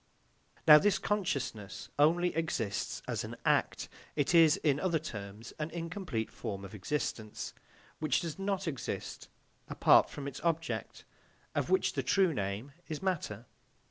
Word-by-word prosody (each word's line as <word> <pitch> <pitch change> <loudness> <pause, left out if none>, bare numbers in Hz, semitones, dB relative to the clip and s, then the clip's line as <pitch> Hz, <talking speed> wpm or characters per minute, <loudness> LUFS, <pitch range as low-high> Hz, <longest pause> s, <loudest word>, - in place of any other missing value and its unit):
Now 150 -1 +11
this 205 +2 +3
consciousness 140 - -2
only 175 +4 +4
exists 115 - -2
as - - -2
an - - -6
act; - - +2 0.3
it 145 +2 +1
is, 165 0 +7
in 145 -6 +1
other 175 -2 +1
terms, 110 -7 -7
an 150 +1 -2
incomplete 165 - -4
form 100 -1 -5
of 95 - -10
existence, 110 0 -3 0.5
which 155 -4 +1
does 165 -2 -5
not 195 -1 -1
exist 135 - -4 0.4
apart - - +5
from 140 -1 -6
its 140 - -6
object, 165 -1 -2 0.5
of - - -1
which 375 - +2
the - - 0
true 190 -4 +3
name 105 +4 -3 0.2
is 155 +2 -5
matter. 145 - -2
150 Hz, 140 wpm, -32 LUFS, 110-175 Hz, 0.5 s, Now